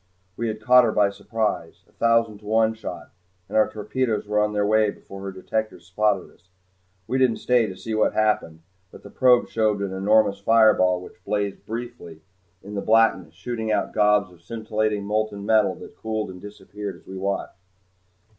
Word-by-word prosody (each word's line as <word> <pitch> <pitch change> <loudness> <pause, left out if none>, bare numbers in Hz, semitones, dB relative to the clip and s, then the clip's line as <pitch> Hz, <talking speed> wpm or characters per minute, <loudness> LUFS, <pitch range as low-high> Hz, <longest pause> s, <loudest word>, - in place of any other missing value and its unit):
We 115 - -2
had 110 -1 -4
caught 125 +3 +6
her 115 - +2
by 105 -2 +2
surprise, 110 +1 -3
a - - -27
thousand 115 -2 +1
to 105 - -19
one 110 +1 +3
shot, 90 -6 -8 0.4
and - - -8
our 110 - +4
torpedoes 110 +1 -2
were 105 0 +1
on 105 0 +1
their 105 -1 0
way 110 0 +3
before 100 -1 -10
her 100 0 -5
detectors 95 -1 -4
spotted 100 +1 0
us. 90 - -28 0.6
We 130 +5 -1
didn't 125 -4 +3
stay 125 -3 +2
to 95 -2 -8
see 110 +4 -5
what 110 - +2
happened, 105 -7 0 0.3
but - - -15
the 100 - -12
probe 125 -2 +4
showed 110 -2 0
an 100 -1 -3
enormous 100 +1 +2
fireball 100 -4 +4
which - - -15
blazed 100 -1 -3
briefly 115 -9 -7 0.4
in 100 - -9
the 100 - -2
blackness, 110 -7 +2
shooting 110 +3 -4
out - - 0
globs 105 -3 +2
of 85 - -20
scintillating 110 +1 -2
molten 105 -1 -2
metal 110 -1 +3
that - - -12
cooled 110 -3 -4
and 90 -1 -12
disappeared 105 0 -8
as - - -19
we 95 - -9
watched. 100 +1 -3
105 Hz, 185 wpm, -24 LUFS, 100-110 Hz, 0.6 s, caught